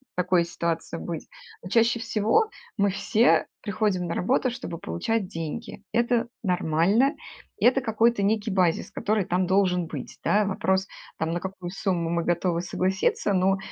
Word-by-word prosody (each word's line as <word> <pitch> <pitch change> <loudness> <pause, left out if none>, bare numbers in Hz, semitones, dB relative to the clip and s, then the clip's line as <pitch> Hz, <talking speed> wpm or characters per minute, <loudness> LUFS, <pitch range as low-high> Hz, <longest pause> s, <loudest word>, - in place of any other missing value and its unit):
в 265 -2 -38
такой 180 -1 +2
ситуации 170 -1 -3
быть. 165 -3 -6 0.3
Но 180 - -7
чаще 230 +3 +3
всего 225 - +2 0.3
мы 200 0 +3
все 215 +4 +3 0.2
приходим 195 -3 0
на 170 - -2
работу, 255 +5 +1
чтобы 200 -9 -6
получать 195 - -2
деньги. 165 +1 -6
Это 235 0 +1
нормально. 190 - +2 0.5
Это 255 +2 +4
какой-то 225 -1 +2
некий 215 +1 +1
базис, 180 -4 +1
который 210 -2 0
там 180 +1 +1
должен 180 -2 +2
быть. 140 -5 -7
Да, 210 0 +3
вопрос, 190 -1 0 0.3
там 160 +1 -1
на 175 - -1
какую 185 -2 -6
сумму 180 -3 -1
мы 170 0 0
готовы 175 0 0
согласиться, 190 +3 0
но 190 +1 +3
190 Hz, 155 wpm, -26 LUFS, 175-220 Hz, 0.5 s, Это